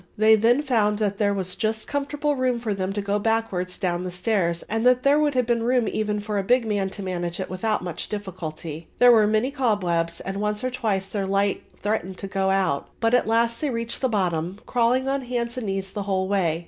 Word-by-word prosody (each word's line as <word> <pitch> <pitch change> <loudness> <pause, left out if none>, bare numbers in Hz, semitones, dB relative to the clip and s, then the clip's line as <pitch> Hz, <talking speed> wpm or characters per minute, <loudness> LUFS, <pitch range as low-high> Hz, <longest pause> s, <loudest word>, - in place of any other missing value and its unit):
They 220 +1 +6
then 235 +6 +3
found 215 -6 +2
that 205 -2 -1
there 205 -2 +3
was 185 -2 -2
just 220 0 -2
comfortable 290 +1 -1
room 255 -2 +1
for 230 -3 -2
them 190 -1 -2
to 205 0 -3
go 200 +1 0
backwards 205 -5 -1
down 175 -3 -1
the 185 - -3
stairs 180 -2 0
and 225 +1 -2
that 250 0 +4
there 285 +2 +4
would 295 -2 +1
have 250 -1 +2
been 235 0 +1
room 245 0 +2
even 210 -1 -1
for 205 0 -2
a - - -1
big 245 +4 +3
man 205 -3 0
to 200 +1 -7
manage 175 -1 -3
it 190 - -4
without 210 +2 -1
much 175 -3 -5
difficulty. 165 -5 -6
There 245 0 +7
were 220 -3 +5
many 220 +5 +1
cobwebs 180 -11 0
and 195 +1 -4
once 210 +1 -1
or 255 - -1
twice 215 -6 -1
their 195 0 -3
light 200 +1 +1 0.2
threatened 195 -3 -1
to 195 - -6
go 195 0 0
out; 190 -7 +1
but 225 +1 +1
at 245 - +3
last 230 +1 +1
they 300 - 0
reached 230 -1 -3
the 260 - +2
bottom, 180 -3 -1
crawling 250 +2 +1
on 275 0 0
hands 240 -1 -3
and 250 -4 -4
knees 195 0 -2
the 205 - -4
whole 190 -1 +1
way. 180 -5 +1
210 Hz, 230 wpm, -24 LUFS, 190-235 Hz, 0.2 s, There